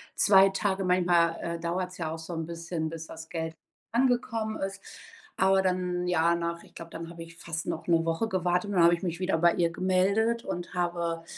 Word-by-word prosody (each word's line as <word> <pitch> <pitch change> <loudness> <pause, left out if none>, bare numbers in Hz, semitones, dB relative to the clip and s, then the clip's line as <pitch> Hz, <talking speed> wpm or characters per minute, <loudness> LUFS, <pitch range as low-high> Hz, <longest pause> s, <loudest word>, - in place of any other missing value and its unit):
2 195 -1 +6
Tage. 195 0 -1
Manchmal, 175 -2 +3
äh, 170 0 -3
dauert's 180 +2 -3
ja 160 -3 -3
auch 160 - -5
so 160 +2 -7
'n 165 -1 -3
bisschen, 165 -1 -4
bis 160 -1 -7
das 160 0 -10
Geld 160 -1 -3 0.4
angekommen 230 -3 +1
ist.“ 195 0 -4 0.6
Aber 190 0 +4
dann, 180 -1 -1
ja, 170 -1 +3
nach 170 0 -3
ich - - -19
glaube, 165 0 -9
dann 165 0 -7
habe 170 -1 -10
ich 165 0 -14
fast 165 -1 -5
noch 160 - -4
'ne 165 -1 +3
Woche 165 +7 0
gewartet 180 0 0
und 205 - -3
dann 170 - +6
habe 170 - +6
ich 170 - -11
mich 170 -1 -2
wieder 185 -3 +1
bei 170 0 +5
ihr 170 -1 +2
gemeldet 200 +6 +1
und 175 0 -5
habe 170 -1 -1
175 Hz, 210 wpm, -28 LUFS, 165-190 Hz, 0.6 s, 2